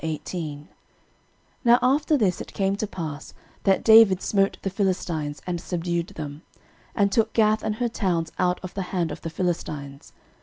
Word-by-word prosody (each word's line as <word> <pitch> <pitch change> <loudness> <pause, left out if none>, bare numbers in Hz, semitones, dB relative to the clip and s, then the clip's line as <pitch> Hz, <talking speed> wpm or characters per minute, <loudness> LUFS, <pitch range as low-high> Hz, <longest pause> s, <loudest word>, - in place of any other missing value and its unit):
13:018:001 155 -1 -5 1.0
Now 240 -1 +6
after 290 +4 +3
this 195 -8 +1
it - - -10
came 195 0 +1
to 215 - -2
pass, 155 -6 -7 0.3
that 195 -1 +3
David 220 -4 +7
smote 195 -1 +1
the 195 - -2
Philistines, 175 -6 -2
and 175 -2 -3
subdued 170 -1 -2
them, 150 -1 -7 0.5
and 200 -2 +2
took 220 +1 +1
Gath 215 -1 +3
and 215 - -2
her 240 +2 0
towns 175 -8 -1
out 180 -1 +1
of 185 - -7
the 195 - -3 0.2
hand 170 -2 0
of - - -7
the 165 - -4
Philistines. 150 -5 -4
180 Hz, 165 wpm, -24 LUFS, 165-210 Hz, 1.0 s, David